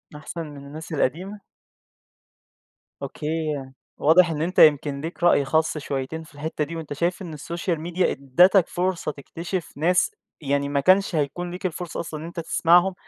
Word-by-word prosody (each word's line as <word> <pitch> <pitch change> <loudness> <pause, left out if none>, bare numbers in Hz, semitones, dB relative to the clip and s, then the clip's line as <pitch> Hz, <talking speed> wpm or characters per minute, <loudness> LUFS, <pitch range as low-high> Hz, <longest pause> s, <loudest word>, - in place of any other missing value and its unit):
أحسن 160 +3 -6
من 140 -2 -10
الناس 155 +3 -9
القديمة؟ 185 +9 -1 1.6
أوكي، 155 0 -3 0.4
واضح 170 +3 +5
إن 150 -1 -3
أنت 180 +3 0
يمكن 145 -2 +5
ليك 165 +2 -6
رأي 145 -5 +5
خاص 160 +2 +1
شويتين 140 +3 -4
في 150 - -18
الحتّة 150 +1 -3
دي، 165 +3 -6
وأنت 155 -3 -5
شايف 175 +6 -1
إن 165 -4 -6
الSocial 170 +3 -3
Media 175 +3 -2
إدَّتَك 175 +7 +4
فرصة 180 -3 -1
تكتشف 170 +5 -6
ناس، 180 +4 +2 0.3
يعني 140 0 0
ما 140 -1 +1
كانش 185 +4 +3
هيكون 160 +4 -2
ليك 180 +1 -7
الفرصة 175 -1 -4
أصلًا 155 -2 -5
إن 160 - -7
أنت 170 0 -7
تسمعهُم 175 +3 +3
160 Hz, 160 wpm, -24 LUFS, 150-175 Hz, 1.6 s, واضح